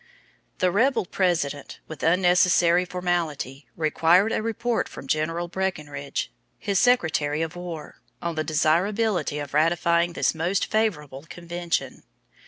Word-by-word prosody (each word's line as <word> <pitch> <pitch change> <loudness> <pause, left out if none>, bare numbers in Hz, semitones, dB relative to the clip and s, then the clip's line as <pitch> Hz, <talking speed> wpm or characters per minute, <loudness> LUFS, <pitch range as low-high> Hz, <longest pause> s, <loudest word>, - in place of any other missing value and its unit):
The 185 -2 +2
rebel 235 +3 +2
President, 170 -7 -1
with 160 - -9
unnecessary 180 0 +4
formality, 170 -7 -3
required 165 +6 +3
a - - 0
report 230 +1 -1
from - - -10
General 165 +4 -1
Breckinridge, 150 -7 -4 0.3
his 200 -2 0
Secretary 160 -11 +2
of 165 +1 -5
War, 175 -3 -8 0.2
on 170 0 -3
the 155 -1 -2
desirability 175 +3 +1
of 145 -2 -6
ratifying 170 +2 +2
this - - +1
most 170 +5 0
favorable 150 -10 -2
convention. 175 -2 -4
170 Hz, 120 wpm, -25 LUFS, 155-185 Hz, 0.3 s, unnecessary